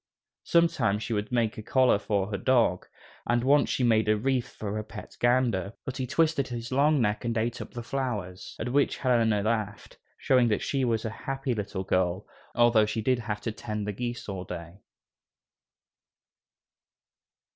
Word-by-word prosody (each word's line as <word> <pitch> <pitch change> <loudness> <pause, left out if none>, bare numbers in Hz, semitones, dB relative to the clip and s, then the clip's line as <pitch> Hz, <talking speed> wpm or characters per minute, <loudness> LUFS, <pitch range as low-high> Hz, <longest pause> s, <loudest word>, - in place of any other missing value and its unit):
Sometimes 165 -11 +2
she 115 - -3
would 105 +1 -2
make 115 -3 0
a - - -4
collar 125 -1 +3
for 100 0 -1
her 100 - -1
dog, 115 -7 +2 0.4
and 120 0 +2
once 140 +2 +4
she 130 - 0
made 110 -2 +3
a 110 - +4
wreath 130 +2 -1
for 105 0 -4
a - - -4
pet - - -10
gander, 120 -6 +1
but 135 - -5
he 130 - -2
twisted 155 -1 +1
his 120 0 -6
long 145 +3 +3
neck 105 -3 0
and 115 -1 -1
ate 115 +2 -1
up - - -7
the 120 - -6
flowers, 110 -9 -4
at 115 - -3
which 145 0 +2
Helena 115 -5 +2
laughed, 110 -2 -3 0.2
showing 125 -2 +3
that 105 - 0
she 135 -2 0
was 115 -2 0
a 110 - -2
happy 135 +2 -3
little 100 -3 -4
girl, 95 0 0 0.3
although 120 -3 +4
she 110 0 -2
did 130 +1 +2
have 105 -2 -4
to 115 - -3
tend 105 -1 -5
the 105 - -3
geese 120 +3 -5
all 95 -3 -4
day. 85 +1 -8
115 Hz, 180 wpm, -27 LUFS, 105-125 Hz, 0.4 s, once